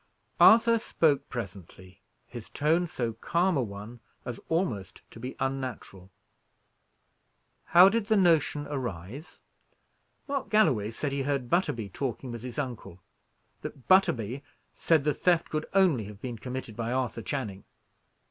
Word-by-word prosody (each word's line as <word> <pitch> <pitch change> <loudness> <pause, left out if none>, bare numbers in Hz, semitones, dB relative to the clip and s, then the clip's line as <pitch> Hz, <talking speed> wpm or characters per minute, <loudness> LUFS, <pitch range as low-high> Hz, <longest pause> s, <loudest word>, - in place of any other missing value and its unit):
Arthur 230 +1 +7
spoke 145 -9 +1
presently, 95 -4 -8 0.2
his 120 -3 -10
tone 165 +4 +1
so 120 -7 -3
calm 175 +9 0
a 135 - +2
one 105 +2 -7 0.3
as 125 -2 -5
almost 160 - -2
to - - -12
be 125 +3 -6
unnatural. 130 -8 -4 1.6
"How 175 +2 +8
did 210 +1 +1
the 220 -1 +3
notion 160 -5 +3
arise?" 125 - -6 0.9
"Mark 275 -2 -3
Galloway 130 - +3
said 140 +5 -3
he 140 0 -1
heard 135 -3 -2
Butterby 120 - 0
talking 125 +3 -4
with 120 -1 -6
his 125 -1 -8
uncle; 125 -10 -5 0.6
that 130 - -9
Butterby 135 - +3 0.3
said 160 -4 +2
the 150 0 +1
theft 175 +3 +1
could 155 0 -2
only 175 - +3
have 100 0 -10
been 120 -1 -6
committed 125 -3 -6
by 115 +1 -3
Arthur 125 -2 -2
Channing. 105 -5 -4
130 Hz, 140 wpm, -28 LUFS, 115-165 Hz, 1.6 s, How